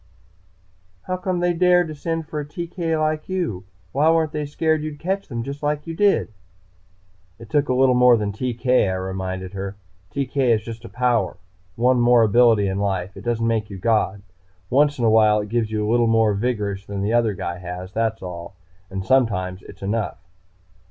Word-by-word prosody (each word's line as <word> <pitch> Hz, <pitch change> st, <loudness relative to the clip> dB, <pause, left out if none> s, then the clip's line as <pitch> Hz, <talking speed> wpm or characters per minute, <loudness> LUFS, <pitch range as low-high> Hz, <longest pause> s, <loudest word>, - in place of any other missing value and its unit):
"How 185 Hz, -, -2 dB
come 185 Hz, -1 st, -2 dB
they 175 Hz, 0 st, +2 dB
dared 180 Hz, -2 st, +3 dB
send 165 Hz, +1 st, -3 dB
for 150 Hz, -, -4 dB
a -, -, -3 dB
TK 165 Hz, +1 st, -3 dB
like 155 Hz, +1 st, -1 dB
you? 170 Hz, -, -2 dB, 0.3 s
Why 150 Hz, +4 st, +3 dB
weren't 160 Hz, -2 st, +2 dB
they 150 Hz, -1 st, -3 dB
scared 155 Hz, +1 st, 0 dB
you'd 155 Hz, -1 st, -5 dB
catch 190 Hz, +5 st, -2 dB
them, 120 Hz, -3 st, -4 dB
just 140 Hz, +3 st, -6 dB
like 150 Hz, 0 st, -1 dB
you 165 Hz, -1 st, -5 dB
did?" 200 Hz, -, +2 dB, 1.0 s
"It 115 Hz, -1 st, -13 dB
took 145 Hz, -2 st, +2 dB
a 130 Hz, -, +2 dB
little 130 Hz, 0 st, +4 dB
more 125 Hz, -1 st, +6 dB
than 105 Hz, -2 st, -2 dB
TK," 125 Hz, 0 st, +1 dB
I 95 Hz, -, -1 dB
reminded 95 Hz, 0 st, -4 dB
her. 100 Hz, 0 st, -5 dB, 0.3 s
"TK 140 Hz, 0 st, -4 dB, 0.2 s
is 110 Hz, -, -4 dB
just 115 Hz, +1 st, -8 dB
a -, -, -8 dB
power, 125 Hz, -2 st, 0 dB, 0.4 s
one 125 Hz, +2 st, +3 dB
more 120 Hz, -1 st, +5 dB
ability 110 Hz, -1 st, +4 dB
in 95 Hz, 0 st, -1 dB
life. 95 Hz, -2 st, -2 dB
It -, -, -9 dB
doesn't 115 Hz, -1 st, -1 dB
make 110 Hz, -2 st, 0 dB
you 100 Hz, -, -7 dB
God. 100 Hz, -2 st, 0 dB, 0.5 s
Once 145 Hz, +3 st, +3 dB
in 120 Hz, -, 0 dB
a -, -, +5 dB
while 110 Hz, -1 st, +5 dB
it 105 Hz, 0 st, -5 dB
gives 115 Hz, -1 st, 0 dB
you 105 Hz, -1 st, -1 dB
a -, -, +1 dB
little 120 Hz, 0 st, +3 dB
more 115 Hz, -2 st, +3 dB
vigorish 100 Hz, -3 st, -2 dB
than 100 Hz, -1 st, -3 dB
the 105 Hz, +3 st, 0 dB
other 115 Hz, -4 st, +2 dB
guy 85 Hz, -1 st, -4 dB
has, 90 Hz, +1 st, -7 dB
that's 110 Hz, -2 st, -1 dB
all. 90 Hz, +1 st, -7 dB, 0.3 s
And 95 Hz, 0 st, -5 dB
sometimes 95 Hz, -7 st, +1 dB
it's 95 Hz, -, -13 dB
not -, -, -3 dB
enough." 110 Hz, +1 st, -2 dB
115 Hz, 200 wpm, -22 LUFS, 100-145 Hz, 1.0 s, more